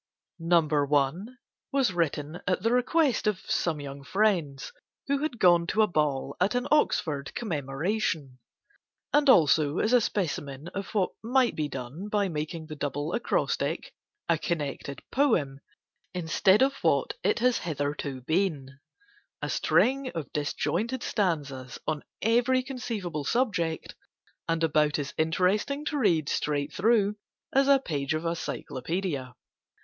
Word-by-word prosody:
No. 165 Hz, -1 st, +3 dB, 0.3 s
I. 135 Hz, -2 st, +4 dB, 0.6 s
was 270 Hz, -8 st, +2 dB
written 160 Hz, -1 st, -2 dB
at 185 Hz, 0 st, 0 dB
the 230 Hz, -, +2 dB
request 250 Hz, 0 st, +2 dB
of 210 Hz, -3 st, +1 dB
some 160 Hz, -4 st, -1 dB
young 140 Hz, -1 st, -7 dB
friends, 160 Hz, -8 st, 0 dB, 0.3 s
who 280 Hz, 0 st, 0 dB
had 300 Hz, -4 st, -2 dB
gone 175 Hz, -4 st, +5 dB
to 215 Hz, +3 st, +3 dB
a -, -, +3 dB
ball 145 Hz, -5 st, 0 dB
at 195 Hz, +6 st, +2 dB
an 245 Hz, +1 st, 0 dB
Oxford 150 Hz, -, +1 dB
Commemoration—and 160 Hz, -, -3 dB
also 155 Hz, -, +5 dB
as 220 Hz, -, +1 dB
a 245 Hz, -, +6 dB
specimen 150 Hz, -7 st, -3 dB
of 195 Hz, +3 st, -6 dB
what 195 Hz, -3 st, +2 dB
might 250 Hz, +2 st, +2 dB
be 155 Hz, -1 st, -1 dB
done 135 Hz, +8 st, -6 dB
by 205 Hz, -2 st, +1 dB
making 155 Hz, +1 st, -4 dB
the 155 Hz, -1 st, -8 dB
Double 145 Hz, +2 st, -3 dB
Acrostic 235 Hz, -, -1 dB, 0.3 s
a -, -, +2 dB
connected 145 Hz, -4 st, -3 dB
poem 175 Hz, -, +1 dB, 0.6 s
instead 190 Hz, +5 st, +3 dB
of 270 Hz, +1 st, +2 dB
what -, -, +2 dB
it -, -, +2 dB
has 250 Hz, +1 st, +2 dB
hitherto 145 Hz, -4 st, -3 dB
been, 145 Hz, -3 st, -1 dB, 0.6 s
a -, -, -1 dB
string 270 Hz, +1 st, +2 dB
of 160 Hz, -3 st, -5 dB
disjointed 225 Hz, -, -1 dB
stanzas, 145 Hz, -, -2 dB
on 155 Hz, -2 st, -1 dB, 0.2 s
every 245 Hz, +3 st, +3 dB
conceivable 225 Hz, -, -4 dB
subject, 180 Hz, -, -1 dB, 0.6 s
and 165 Hz, 0 st, +1 dB
about 150 Hz, -1 st, +2 dB
as 140 Hz, -2 st, -4 dB
interesting 190 Hz, -, +1 dB
to 300 Hz, -, -1 dB
read 170 Hz, -, +2 dB
straight 145 Hz, -1 st, -1 dB
through 210 Hz, -1 st, +2 dB, 0.4 s
as 275 Hz, +1 st, +4 dB
a 280 Hz, -1 st, +7 dB
page 150 Hz, -, -2 dB
of 155 Hz, +2 st, -3 dB
a -, -, +2 dB
Cyclopædia. 160 Hz, -4 st, -4 dB
170 Hz, 135 wpm, -28 LUFS, 145-225 Hz, 0.6 s, a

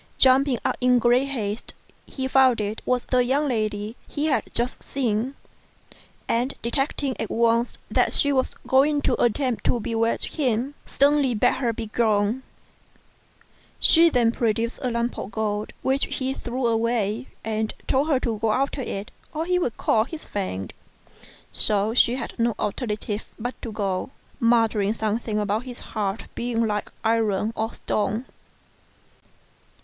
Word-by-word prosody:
Jumping 265 Hz, 0 st, +5 dB
up 255 Hz, -, +1 dB
in 250 Hz, 0 st, +5 dB
great 245 Hz, +3 st, +3 dB
haste, 220 Hz, -5 st, -4 dB, 0.3 s
he 265 Hz, -1 st, -3 dB
found 260 Hz, -3 st, +4 dB
it 210 Hz, +1 st, -3 dB
was 250 Hz, -1 st, +1 dB
the 250 Hz, -1 st, +2 dB
young 275 Hz, +4 st, +1 dB
lady 215 Hz, -3 st, -2 dB
he 290 Hz, -, -2 dB
had 295 Hz, -4 st, +2 dB
just 240 Hz, +2 st, -2 dB
seen; 250 Hz, 0 st, -1 dB, 0.9 s
and 245 Hz, +4 st, 0 dB
detecting 270 Hz, +2 st, -1 dB
at 220 Hz, -, -3 dB
once 230 Hz, +1 st, +2 dB
that -, -, +3 dB
she 285 Hz, 0 st, +2 dB
was 260 Hz, -1 st, 0 dB
going 285 Hz, +3 st, +4 dB
to -, -, +2 dB
attempt 245 Hz, 0 st, +1 dB
to 240 Hz, -, +1 dB
bewitch 230 Hz, +1 st, 0 dB
him, 260 Hz, -1 st, 0 dB
sternly 280 Hz, -3 st, +3 dB
bade 245 Hz, +4 st, +3 dB
her 240 Hz, -3 st, +1 dB
begone. 220 Hz, 0 st, 0 dB, 1.4 s
She 335 Hz, +1 st, +6 dB
then 240 Hz, -6 st, +3 dB
produced 230 Hz, 0 st, -1 dB
a 255 Hz, -, 0 dB
lump 235 Hz, 0 st, -1 dB
of -, -, -5 dB
gold 215 Hz, -1 st, -2 dB
which 270 Hz, +1 st, +1 dB
he 265 Hz, 0 st, -2 dB
threw 250 Hz, 0 st, -3 dB
away, 230 Hz, 0 st, 0 dB, 0.2 s
and 220 Hz, 0 st, -1 dB
told 270 Hz, +3 st, +2 dB
her 285 Hz, -5 st, +3 dB
to 225 Hz, -3 st, -2 dB
go 220 Hz, -1 st, +2 dB
after 275 Hz, +2 st, 0 dB
it 200 Hz, -4 st, -5 dB, 0.2 s
or 320 Hz, +2 st, -1 dB
he 360 Hz, +1 st, +2 dB
would 245 Hz, -10 st, -2 dB
call 220 Hz, 0 st, +2 dB
his 315 Hz, +3 st, -8 dB
friend. 95 Hz, -, -4 dB, 0.8 s
So 210 Hz, +1 st, +4 dB
she 240 Hz, 0 st, +4 dB
had 240 Hz, -2 st, -6 dB
no 230 Hz, -1 st, +2 dB
alternative 210 Hz, 0 st, -3 dB
but 245 Hz, +3 st, -3 dB
to 230 Hz, -, -5 dB
go, 195 Hz, -3 st, -2 dB, 0.3 s
muttering 225 Hz, -3 st, +3 dB
something 220 Hz, 0 st, -1 dB
about 210 Hz, +3 st, 0 dB
his 250 Hz, -1 st, -8 dB
heart 205 Hz, -1 st, -2 dB
being 235 Hz, -1 st, -1 dB
like 210 Hz, -1 st, -2 dB
iron 220 Hz, -2 st, +1 dB
or 220 Hz, +1 st, -2 dB
stone. 215 Hz, +4 st, -1 dB
235 Hz, 150 wpm, -24 LUFS, 215-260 Hz, 1.4 s, She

